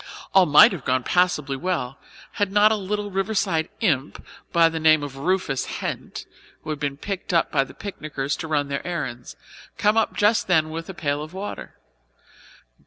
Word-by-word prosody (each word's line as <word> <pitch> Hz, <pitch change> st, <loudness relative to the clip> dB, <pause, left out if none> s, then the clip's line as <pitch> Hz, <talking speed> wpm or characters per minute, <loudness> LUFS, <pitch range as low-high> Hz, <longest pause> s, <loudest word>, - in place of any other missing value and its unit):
All 190 Hz, -2 st, +6 dB
might 150 Hz, 0 st, +8 dB
have 175 Hz, -9 st, -6 dB
gone 130 Hz, 0 st, 0 dB
passably 150 Hz, -6 st, +1 dB
well, 135 Hz, -5 st, -3 dB, 0.3 s
had 205 Hz, -2 st, -1 dB
not 210 Hz, +1 st, +5 dB
a -, -, +3 dB
little 205 Hz, 0 st, -3 dB
Riverside 195 Hz, -4 st, 0 dB
imp, 145 Hz, -, -1 dB, 0.3 s
by 170 Hz, -1 st, +5 dB
name 160 Hz, -2 st, +3 dB
of 140 Hz, -2 st, -6 dB
Rufus 160 Hz, -3 st, -1 dB
Hent, -, -, -5 dB, 0.4 s
who 155 Hz, -, -5 dB
had 150 Hz, -, -4 dB
been 140 Hz, -2 st, -3 dB
picked 190 Hz, +1 st, -4 dB
up 165 Hz, -, +2 dB
by 140 Hz, -3 st, +2 dB
the 135 Hz, -, -13 dB
picnickers 150 Hz, -8 st, -4 dB
to 160 Hz, -, -5 dB
run 145 Hz, -2 st, 0 dB
their 140 Hz, +5 st, -4 dB
errands, 130 Hz, -9 st, -5 dB, 0.4 s
come 210 Hz, +2 st, +2 dB
up 225 Hz, -, +1 dB
just 210 Hz, +2 st, +2 dB
then 160 Hz, -4 st, +2 dB
with 165 Hz, +2 st, -6 dB
a 190 Hz, -, -7 dB
pail 145 Hz, -3 st, -2 dB
of 155 Hz, +4 st, -9 dB
water. 200 Hz, +2 st, -7 dB
160 Hz, 175 wpm, -23 LUFS, 145-190 Hz, 0.4 s, might